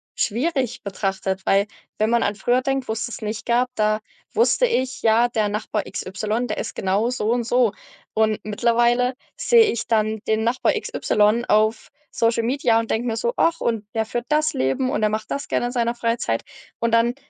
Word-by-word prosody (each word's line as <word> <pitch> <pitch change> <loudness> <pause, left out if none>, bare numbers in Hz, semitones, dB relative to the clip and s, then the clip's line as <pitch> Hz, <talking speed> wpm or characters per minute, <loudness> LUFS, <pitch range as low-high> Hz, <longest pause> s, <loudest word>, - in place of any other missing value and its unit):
schwierig 260 +2 -1
betrachtet, 195 -1 -2
weil 195 +1 +3 0.3
wenn 215 +1 +1
man 235 - +3
an 205 - 0
früher 245 +6 +1
denkt, 270 -1 -1
wo's 220 +1 -2
das 240 - -8
nicht 215 0 -4
gab, 245 +1 +2
da 215 0 +1 0.3
wusste 470 +2 +3
ich: 260 - -1
Ja, 230 +2 +4
der 220 -3 0
Nachbar 210 0 -2
X - - -5
Y, 215 +6 -2
der 215 - -3
ist - - -5
genau 200 +5 0
so 225 -3 -1
und 240 0 +1
so. 245 -2 +3 0.4
Und 220 -1 +1
mittlerweile 240 +3 +2 0.2
sehe 480 -2 +5
ich 235 - -4
dann 220 -1 +1
den 220 0 +1
Nachbar 245 +2 +1
X - - -5
Y 215 +3 +2
auf 215 +1 +2 0.2
Social 230 0 +1
Media 240 -1 +2
und 230 - -3
denke 235 +2 0
mir 225 -1 -1
so: 475 - -1
„Ach, 335 0 +2
und 220 -3 -2
der 220 0 +1
führt 240 +2 -4
das 305 0 +2
Leben 135 - 0
und 290 - -1
der 215 - +3
macht 215 +1 -4
das 280 - -3
gerne 240 - 0
in - - -4
seiner 235 -1 0
Freizeit“, 230 - -1 0.4
und 230 0 0
dann 230 +1 +3
230 Hz, 200 wpm, -22 LUFS, 215-245 Hz, 0.4 s, sehe